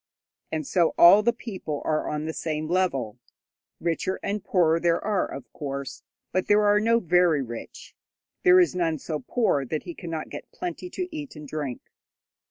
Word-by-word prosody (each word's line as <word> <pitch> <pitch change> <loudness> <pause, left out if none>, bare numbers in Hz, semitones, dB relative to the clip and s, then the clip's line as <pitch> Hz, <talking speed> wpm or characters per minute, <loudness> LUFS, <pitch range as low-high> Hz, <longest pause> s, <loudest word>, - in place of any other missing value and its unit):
And 155 -2 -2
so 170 +2 +2
all 175 +5 +9
the 235 +3 +3
people 190 - -6
are 155 -1 0
on 150 0 -3
the 160 - -3
same 155 -1 -3
level. 135 - 0 0.6
Richer 170 +2 -1
and 205 0 -2
poorer 165 -3 +3
there 170 0 +2
are, 205 -2 0
of 140 - -9
course, 140 -2 -5 0.3
but 185 +1 0
there 210 0 +4
are 205 0 +5
no 230 +2 +3
very 175 -6 +3
rich; 120 -2 -9 0.5
there 370 0 +7
is 355 - +4
none 165 -3 0
so 150 +2 -4
poor 220 - +1
that 150 +4 -3
he 175 - -7
cannot 165 -2 -6
get - - -8
plenty 360 0 -5
to 365 0 -4
eat 290 - -7
and 150 -1 -9
drink. 140 -4 -4
170 Hz, 180 wpm, -26 LUFS, 150-205 Hz, 0.6 s, all